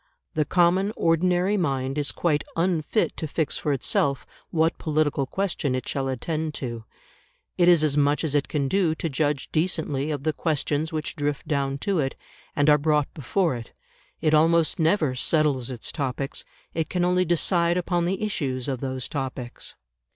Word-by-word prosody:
The 155 -1 +1
common 180 +5 +3
ordinary 180 +4 +2
mind 135 -6 -1
is 145 -1 0
quite 155 -4 0
unfit 170 +3 +1
to 160 - -3
fix 155 +1 -1
for 150 - -1
itself 140 0 0 0.2
what 160 0 +1
political 150 -3 0
question 170 -7 -1
it 130 - -4
shall 135 -1 -1
attend 155 +4 -2
to; 120 -4 -5 0.7
it 175 - +3
is 170 -3 +6
as 150 -2 +2
much 145 +2 +2
as 155 -3 -1
it 145 -1 +1
can 145 -4 -1
do 170 0 +2
to 165 - -3
judge 145 -1 -1
decently 155 -4 0
of 145 -3 -3
the 155 0 +1
questions 155 0 -1
which 155 -2 -3
drift 145 -2 -2
down 140 -3 0
to 195 -4 +1
it, 135 -2 -1 0.4
and 145 0 +2
are 150 -1 +6
brought 150 -1 +1
before 165 +2 0
it; 115 -1 -9 0.5
it 155 -1 +2
almost 165 +2 +3
never 160 -4 +2
settles 135 -1 +1
its 125 -3 -5
topics; 135 -1 -3 0.3
it 160 -1 -2
can 180 -1 +1
only 180 +1 +3
decide 175 0 +2
upon 175 -1 0
the 190 +4 -1
issues 135 -11 -2
of 130 -3 -2
those 130 -1 -4
topics. 130 -4 -5
155 Hz, 175 wpm, -25 LUFS, 140-170 Hz, 0.7 s, is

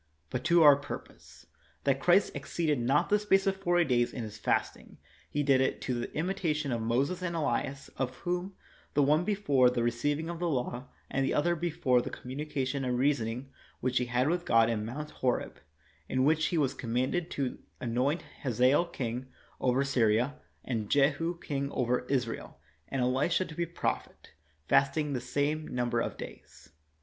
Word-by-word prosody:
But 125 - -2
to 170 0 +5
our 145 -2 +9
purpose: 145 - -9 0.4
that 135 -1 +2
Christ 180 +7 +4
exceeded 145 +1 -1
not 130 +5 +2
the 210 - +4
space 195 -2 +3
of 195 -1 +2
forty 175 -2 +2
days 120 -2 +2
in 120 - -5
His 105 -1 -8
fasting, - - -1 0.3
He 145 - 0
did 135 -2 +4
it 130 - 0
to 130 - -2
the 120 -1 -3
imitation 155 -4 -1
of 115 -2 -1
Moses 130 +11 0
and 175 -2 -2
Elias; 140 -3 -1
of 130 -1 -2
whom, 180 +4 -3 0.4
the 145 - +5
one 150 +4 +3
before 175 -11 +3
the 125 -1 -1
receiving 145 +7 0
of 170 -1 -5
the 175 -1 0
law, 125 -2 -2 0.2
and 135 - +1
the - - 0
other 170 +4 +2
before 150 -7 +1
the - - -5
communication 135 0 -3
and 125 -1 0
reasoning 130 -1 0 0.3
which 125 0 +1
he 125 - 0
had 125 +2 +1
with 175 +2 0
God 115 -6 +4
in 105 -2 -1
Mount 145 +7 -5
Horeb, 125 -2 -1 0.5
in 130 0 +2
which 155 +1 +3
he 170 - -1
was 140 -4 +2
commanded 130 +9 -1
to 135 -3 -2 0.2
anoint 130 +7 0 0.2
Hazael 130 +5 +3
king 130 -6 -4 0.3
over 130 +2 +2
Syria, 125 +1 +2 0.3
and 110 -5 -2
Jehu 150 +5 +2
king 140 -4 -3
over 125 0 0
Israel, 125 -4 -2 0.3
and 135 -2 -1
Elisha 140 +9 +1
to 160 - -9
be 170 +2 -2
prophet, 170 - -4 0.4
fasted 145 +1 +2
the 125 - -2
same 145 +5 -1
number 120 -1 -1
of - - -2
days. - - -11
140 Hz, 175 wpm, -30 LUFS, 125-160 Hz, 0.5 s, our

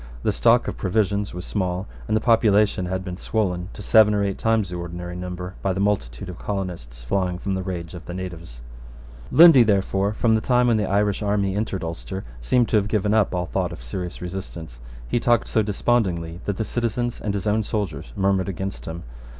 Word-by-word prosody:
The - - +2
stock - - +3
of - - -4
provisions 100 +1 0
was 90 +1 -7
small; 95 -2 -2 0.2
and 110 - +2
the - - -1
population 105 -5 +3
had 95 +1 -3
been 90 -1 -5
swollen 90 -4 -1
to 105 - -9
seven 105 0 +5
or 100 - +1
eight 100 -1 -2
times 110 -4 +1
the - - -4
ordinary 85 0 -6
number 90 0 -6
by 95 - 0
a 95 - -3
multitude 95 -13 -1
of 90 -1 -8
colonists 85 -13 -5
flying 90 +8 -1
from 95 +2 -3
the 95 - -1
rage 90 -3 -5
of 90 -1 -10
the 90 - -5
natives, 85 -10 -7 0.7
Lundy, 165 -5 +9
therefore, 100 -1 +2
from 115 +1 +2
the 110 - +2
time 125 0 +3
when 115 - +3
the 105 -2 -1
Irish 100 +1 +1
army 100 -2 0
entered 100 -3 -2
Ulster, 85 +3 -5 0.2
seems 120 - +2
to 110 - +3
have 100 -1 +1
given 105 -1 +1
up 105 -4 +2
all 90 0 -1
thought - - -2
of - - -9
serious 90 +9 -5
resistance, 85 -8 -7 0.3
He 120 - +1
talked 120 0 +2
so 110 - +2
despondingly 95 -6 0
that 100 -2 -2
the 110 - -1
citizens 120 +1 -2
and 105 -1 -2
his 100 0 -3
own 105 +1 +2
soldiers 95 - -3
murmured 95 -1 +1
against 95 +1 -5
him. 80 +1 -6
95 Hz, 205 wpm, -23 LUFS, 90-105 Hz, 0.7 s, Lundy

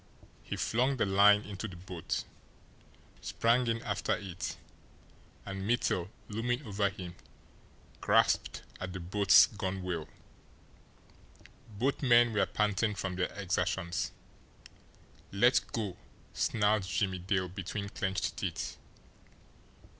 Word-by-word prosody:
He - - -5
flung 130 +4 +1
the 115 - +2
line 100 +1 +6
into 105 +1 -5
the 95 - -10
boat, 90 -1 -4 1.0
sprang 120 +2 +2
in 115 0 -1
after 105 -1 0
it 95 -3 -5 0.9
and 95 -1 -5
Mittel, 95 -4 0 0.2
looming 120 +5 -2
over 100 -2 +1
him, 90 -3 -8 0.9
grasped - - +2 0.2
at 90 0 -5
the 95 - -5
boat's 95 +3 +6
gunwhale. 95 -5 -4 1.7
Both 135 +6 0
men 120 -3 +5
were 105 - +2
panting 105 0 +1
from 95 -2 -3
their 90 0 -1
exertions. 90 -2 -1 1.2
"Let 120 +6 +4
go!" 105 -6 -3 0.4
snarled 105 -1 +2
Jimmie 95 0 -1
Dale 95 +1 0
between 95 +2 -5
clenched 95 -2 -2
teeth. - - -3
100 Hz, 110 wpm, -31 LUFS, 95-110 Hz, 1.7 s, line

